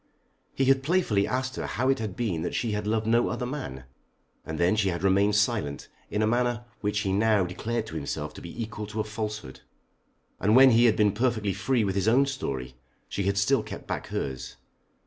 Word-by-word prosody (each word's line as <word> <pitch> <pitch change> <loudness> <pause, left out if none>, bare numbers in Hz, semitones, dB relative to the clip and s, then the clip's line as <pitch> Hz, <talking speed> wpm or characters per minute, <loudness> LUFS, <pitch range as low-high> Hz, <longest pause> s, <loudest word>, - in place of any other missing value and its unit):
He 135 - +2
had 135 0 +4
playfully 135 - +1
asked 130 0 -2
her - - -3
how 130 - -1
it 135 - +2
had 105 -4 -4
been 100 -9 -1
that 85 - -3
she 115 - -1
had 105 0 -2
loved 110 0 0
no 115 +2 +3
other 125 0 -3
man, 125 - -5 0.6
and 80 - -5
then 85 +5 +3
she 105 -3 +2
had 85 0 -3
remained 100 +2 +3
silent 105 - 0 0.2
in 105 +1 0
a - - +4
manner 120 +1 0
which 105 0 -1
he 95 -2 -1
now 105 -1 +3
declared 110 +6 -3
to 80 - -9
himself 75 -3 -4
to - - -10
be 85 - -9
equal 105 -1 -6
to 105 +1 -5
a - - +2
falsehood. 105 - -5 0.8
And 105 +3 +3
when 130 0 +8
he 120 +1 +5
had 115 - +5
been 105 -1 +3
perfectly 110 -2 0
free 115 +5 +1
with 95 -2 0
his 100 +1 0
own 130 +5 +5
story, 70 - -4 0.4
she 100 - -2
had 100 0 +1
still 100 - +3
kept - - -8
back - - -4
hers. 65 -1 -4
105 Hz, 215 wpm, -27 LUFS, 95-120 Hz, 0.8 s, when